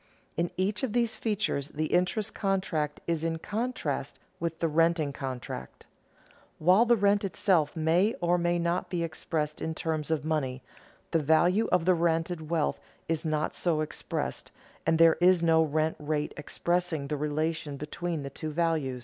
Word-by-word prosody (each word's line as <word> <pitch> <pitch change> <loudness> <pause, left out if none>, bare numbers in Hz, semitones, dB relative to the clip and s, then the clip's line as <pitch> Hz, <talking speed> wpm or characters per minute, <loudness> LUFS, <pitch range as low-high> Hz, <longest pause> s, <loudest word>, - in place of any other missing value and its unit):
In 170 +1 0
each 200 +3 0
of 260 -6 -2
these 235 -2 +1
features 205 - -1
the 155 +1 -3
interest 180 +4 +1
contract 185 -7 -1
is 165 -2 -1
in 165 0 0
contrast 230 +9 -3 0.2
with 165 -1 -2
the 165 - 0
renting 160 -2 +2
contract. 125 - -6 0.7
While 185 +8 +5
the 240 0 +5
rent 205 -1 +3
itself 180 -5 +1
may 170 +7 +2
or 175 0 +2
may 175 0 +1
not 170 +1 -1
be 175 -2 -1
expressed 160 -2 -3
in 160 0 -2
terms 155 -2 -2
of 155 -2 0
money, 135 -5 -1 0.5
the 165 - +3
value 175 +8 +3
of 180 -2 +3
the 185 - +5
rented 165 -1 0
wealth 165 -3 0 0.3
is 165 -1 -1
not 155 -1 0
so 165 -3 0
expressed, 155 - -4 0.4
and 165 0 +4
there 165 0 +6
is 180 -1 +5
no 165 -1 +5
rent 155 0 0
rate 150 0 -2
expressing 170 0 -1
the 150 - -2
relation 150 0 -2
between 155 +2 -4
the 140 - -6
two 155 - -5
values. 155 -5 0
165 Hz, 165 wpm, -29 LUFS, 155-180 Hz, 0.7 s, there